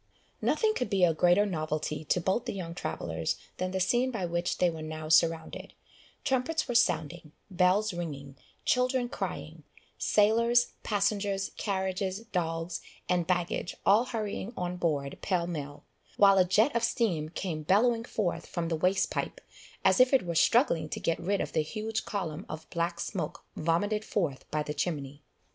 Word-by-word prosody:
Nothing 435 -1 +2
could 250 - -2
be 195 -3 +2
a 170 -2 +5
greater 175 +5 +4
novelty 155 -4 -2
to 180 - +2
both 190 +6 0
the - - -3
young 170 -3 -5
travellers 175 - -3 0.2
than 185 - -1
the 190 0 -2
scene 245 +7 +2
by 220 -8 -2
which 170 +1 -1
they 180 - +3
were 165 -2 -3
now 155 0 -6
surrounded; 160 0 +2 0.5
trumpets 270 +5 0
were 245 - -2
sounding 165 -9 +1 0.2
bells 185 +4 +3
ringing 140 -5 -6 0.3
children 250 -1 +2
crying - - -5 0.4
sailors, 235 +3 +3
passengers, 200 -1 0
carriages, 190 0 -2
dogs, 165 -1 -2 0.3
and 175 -2 +1
baggage 175 -1 -1
all 215 +5 +5
hurrying 220 -2 -4
on 180 -1 -2
board 145 -6 -1
pell 180 -3 0
mell, 145 -4 -6 0.3
while 195 -1 +6
a 185 - +5
jet 220 +10 +3
of 235 - +1
steam 180 -10 0
came 165 -2 -4
bellowing 225 +8 +3
forth 210 -7 -2
from 170 -2 -3
the 165 - +1
waste 185 +4 +1
pipe, - - -3 0.5
as - - +5
if 255 +2 +5
it 260 -8 +4
were 170 - -2
struggling 165 - +3
to - - -4
get 165 - 0
rid 195 +3 0
of - - -3
the 155 - +2
huge 215 +7 -3
column 180 -4 -3
of 155 0 -7
black 170 0 -1
smoke 175 -1 -4
vomited 205 +7 0
forth 165 -12 -2
by 150 0 -1
the 150 - -4
chimney. 145 -2 -3
180 Hz, 165 wpm, -29 LUFS, 165-210 Hz, 0.5 s, while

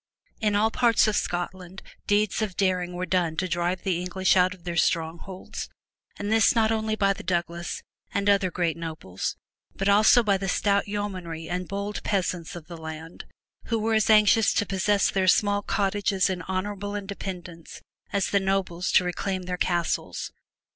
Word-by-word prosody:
In 210 -2 +1
all 220 +2 +3
parts 235 -2 +3
of 215 - +1
Scotland 180 +1 -3 0.2
deeds 205 +1 +2
of 200 -5 -3
daring 180 -2 +1
were 180 +1 -3
done 175 -4 0
to 185 - 0
drive 175 +1 -1
the 180 -3 0
English 185 +1 +1
out 185 0 +4
of 180 - -22
their 175 -1 -4
strongholds 170 +3 -2 0.5
and 205 +1 -3
this 225 +2 +4
not 220 -1 +3
only 220 -1 0
by 200 -2 +2
the - - -9
Douglas 170 -1 -3 0.3
and 200 0 -1
other 200 -2 +4
great 170 -2 -1
nobles 160 - -5 0.4
but 195 - -2
also 215 +4 +6
by 200 -3 +2
the 195 0 -2
stout 200 +2 +1
yeomanry 185 -6 -4
and 180 +1 -3
bold 200 +1 -4
peasants 180 -4 -2
of 170 -3 -9
the 170 +1 -9
land, 160 +1 -8 0.4
who 230 - 0
were 225 +1 0
as 220 0 +2
anxious 215 0 +5
to 205 - +2
possess 200 +1 +1
their 190 -1 +1
small 205 +2 +3
cottages 200 -1 +1
in 180 -1 -3
honorable 205 +2 -3
independence 185 -4 -7 0.3
as 200 -1 0
the 200 - +4
nobles 190 -2 -1
to - - +6
reclaim 185 +1 -2
their 180 0 -3
castles. 175 -1 -1
190 Hz, 175 wpm, -26 LUFS, 175-205 Hz, 0.5 s, also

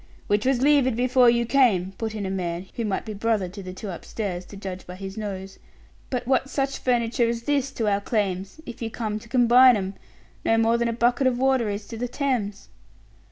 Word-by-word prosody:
"Which 205 +4 +1
was 265 -1 +2
levied 280 -4 +4
before 250 0 +4
you 235 0 +2
came," 225 -8 +3
put 220 -1 -3
in 205 -2 -3
a 190 - -3
man 175 -1 -3
who 235 - -3
might 205 -3 -2
be 215 - -5
brother 210 -2 0
to 200 +3 -9
the 185 -1 -7
two 190 +2 -6
upstairs, 180 0 -5
to 200 - -11
judge 190 -2 -7
by 180 - -8
his 190 +1 -7
nose. 195 -3 -6 0.5
"But 250 -2 -2
what's 265 +1 +1
such 275 -1 -1
furniture 235 -1 +1
as 230 0 -3
this 280 0 0
to 225 - -1
our 200 -1 +2
claims 195 +1 -2
if 240 -1 -9
you 225 - -2
come 215 -2 -3
to 230 - -15
combine 245 0 +6
'em? 190 -1 -3 0.5
No 225 - +3
more 230 +1 +3
than 235 - +1
a - - 0
bucket 240 +3 +2
of 250 -2 +1
water 260 -3 +2
is 205 0 -4
to 230 - -6
the 245 +2 -2
Thames." 240 -7 -2
225 Hz, 220 wpm, -24 LUFS, 200-245 Hz, 0.5 s, combine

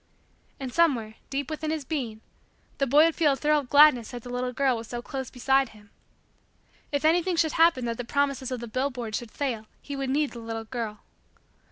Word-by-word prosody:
And 260 -3 -5
somewhere, 260 -11 +2 0.2
deep 275 +1 -3
within 310 0 -3
his 310 -3 -2
being, 240 -9 -3 0.6
the 275 - +2
boy 295 +5 +6
would 330 - +2
feel 305 -4 +3
a - - -1
thrill 300 +2 +2
of 270 -4 -8
gladness 285 -6 +6
that 245 -2 -8
the 245 - -8
little 250 0 -2
girl 260 0 +2
was 225 0 -6
so 240 - -5
close 265 +1 -5
beside 265 +1 +2
him. 210 -2 -18 1.0
If 285 +1 -1
anything 345 +3 +3
should 325 -2 +2
happen 325 -7 +4
that 230 -1 -2
the 245 - -3
promises 275 0 0
of 255 -2 -4
the 235 - -6
billboards 245 -2 -2
should 240 - -10
fail 230 -4 -3
he 285 - -7
would 270 -1 -3
need 290 +2 +1
the 235 - -8
little 225 -1 -5
girl. 220 -2 -5
265 Hz, 210 wpm, -27 LUFS, 235-290 Hz, 1.0 s, boy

